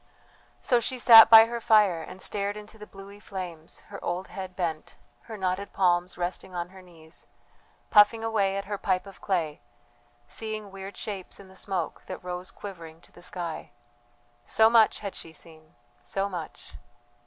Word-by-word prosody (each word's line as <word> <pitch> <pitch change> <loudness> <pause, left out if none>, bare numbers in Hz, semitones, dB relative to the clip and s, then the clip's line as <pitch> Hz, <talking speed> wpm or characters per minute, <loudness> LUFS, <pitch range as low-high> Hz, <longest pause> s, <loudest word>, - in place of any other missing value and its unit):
So 245 - +3
she 255 +2 -4
sat 225 -2 +9
by 225 0 +10
her 235 0 -5
fire 205 -7 +4
and 185 +3 -8
stared 205 0 -2
into 210 +1 -12
the 210 - -10
bluey 200 +1 -13
flames, 180 -6 -8
her 200 - -9
old 180 +2 -3
head 190 -2 -8
bent, 165 -4 -4 0.3
her 220 - -6
knotted 190 +1 -3
palms 180 -1 +1
resting 180 +1 -5
on 175 0 -4
her 190 0 -14
knees, 165 -3 -13 0.6
puffing 210 +2 +5
away 200 -4 0
at 195 - -4
her 205 0 -5
pipe 185 -1 0
of 195 -1 -14
clay, 165 -5 -2 0.7
seeing 215 -2 -6
weird 195 +1 -9
shapes 195 -4 -7
in 195 -1 -14
the 190 - -17
smoke 190 -4 -4
that - - -7
rose 180 +1 -5
quivering 165 -5 -10
to - - -20
the - - -16
sky. 175 -3 -6 0.7
So 220 0 +4
much 225 -2 +4
had 200 -2 -5
she 165 - -9
seen, 160 -2 -14 0.3
so 195 +12 -2
much 175 -5 -8
190 Hz, 170 wpm, -27 LUFS, 175-210 Hz, 0.7 s, by